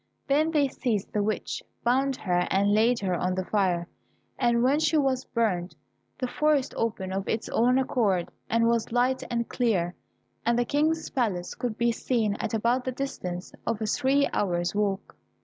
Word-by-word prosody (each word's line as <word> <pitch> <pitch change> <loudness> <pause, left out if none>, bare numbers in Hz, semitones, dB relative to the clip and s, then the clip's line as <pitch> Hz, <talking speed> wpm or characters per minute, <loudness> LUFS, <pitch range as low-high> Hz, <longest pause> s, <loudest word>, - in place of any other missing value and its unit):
Then 300 +3 +2
they 300 -3 +3
seized 235 -6 -2
the 210 - +1
witch, 215 +1 -2 0.2
bound 265 +3 +2
her 180 -5 0
and 200 +1 +2
laid 230 +2 +3
her 190 -2 0
on 180 +1 0
the 185 0 -2
fire, 180 -5 +1 0.5
and 235 -1 +3
when 275 +4 +3
she 315 0 +2
was 270 -3 +1
burnt 190 -6 -1 0.4
the 255 - -2
forest 295 +1 +1
opened 200 -5 -2
of 195 0 -3
its 220 - -1
own 245 +3 +3
accord, 215 -9 +1 0.2
and 230 0 +3
was 230 -1 +1
light 250 +2 +2
and 235 -1 -1
clear, 190 -8 0 0.5
and 235 0 +2
the 245 - +2
King's 310 +4 +1
palace 195 -9 -1
could 235 -3 -4
be 235 0 +2
seen 225 -3 0
at - - -2
about 235 +4 +1
the 255 - -2
distance 185 -9 -5
of 230 -2 0
a 220 - -2
three 275 +5 +2
hours 175 -3 0
walk. 205 -1 -1
230 Hz, 180 wpm, -27 LUFS, 195-260 Hz, 0.5 s, they